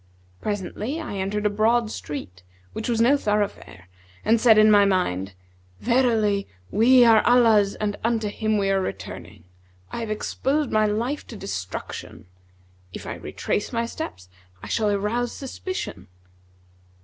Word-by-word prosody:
Presently 210 - -3
I 305 -11 -5
entered 205 +2 -2
a - - +4
broad 220 +2 +2
street 95 - -7 0.3
which 220 - -4
was 230 -2 +1
no 255 +5 +5
thoroughfare 205 - -2 0.4
and 225 +1 +3
said 225 -3 +6
in 215 0 +7
my 205 -1 +7
mind, 100 - 0 0.4
'Verily, 225 -5 +2 0.2
we 245 +5 +6
are 225 -2 +6
Allah's 225 -5 +4
and 205 -1 -2
unto 225 -2 0
Him 215 +1 -1
we 195 -1 +1
are 195 0 +2
returning! - - -7 0.5
I - - -4
have 225 -2 -4
exposed 270 +6 -1
my 215 0 +3
life 235 +8 -2
to 235 - -9
destruction. 145 - -6 0.7
If - - -8
I - - -4
retrace 205 - -3
my 235 -1 -1
steps, 230 - -7 0.4
I - - -7
shall 215 -2 +1
arouse 210 +4 -1
suspicion.' 270 - -6
215 Hz, 145 wpm, -24 LUFS, 200-235 Hz, 0.7 s, in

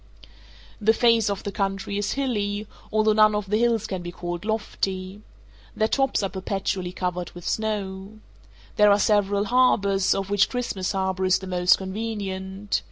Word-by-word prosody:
The 220 +2 +4
face 230 -3 +4
of 200 -1 -3
the 200 - -4
country 195 0 -2
is 205 0 -1
hilly, 210 -6 -1 0.3
although 215 0 +3
none 215 0 +5
of 210 -1 -3
the 210 - +3
hills 230 -2 +2
can 190 -4 -4
be 175 0 -6
called 175 +2 -5
lofty. 195 -3 -3 0.5
Their 220 - +2
tops 270 -2 +1
are 195 - 0
perpetually 190 -1 -3
covered 180 -1 -3
with 175 -1 -9
snow. 205 -1 -3 0.6
There 210 0 +6
are 200 - +5
several 205 -1 +2
harbors, 200 -5 +3
of 195 0 -3
which 205 -1 +3
Christmas 220 -7 -2
Harbour 190 -1 -1
is 185 0 +4
the 190 - -9
most 180 -1 +3
convenient. 195 -1 -3
200 Hz, 165 wpm, -24 LUFS, 190-215 Hz, 0.6 s, There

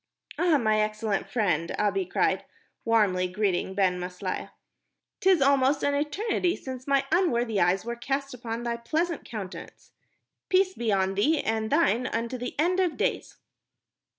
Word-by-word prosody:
"Ah, 345 -4 +4
my 215 -4 +2
excellent 215 -1 -1
friend," 175 -8 0
Abi 195 -3 0
cried, - - +1 0.4
warmly 205 -5 +2
greeting 190 -1 -1
Ben 185 -2 +2
Maslia, 180 +1 -5 0.7
"'tis 375 -6 +4
almost 275 0 +3
an 285 - +2
eternity 350 +5 0
since 260 0 -8
my 275 -1 +2
unworthy 240 - +2
eyes 180 +4 +2
were 235 0 -3
cast 275 +3 -3
upon 235 -1 -5
thy 235 -1 -2
pleasant 320 +8 -2
countenance. 205 -4 -8 0.6
Peace 375 0 +3
be 235 - -1
on 190 -1 +1
thee 290 +11 +2
and 220 0 -1
thine 255 -6 +2
unto 235 +2 -3
the 245 - -5
end 360 +4 +2
of 360 -4 +1
days." - - -2
235 Hz, 150 wpm, -27 LUFS, 200-285 Hz, 0.7 s, Ah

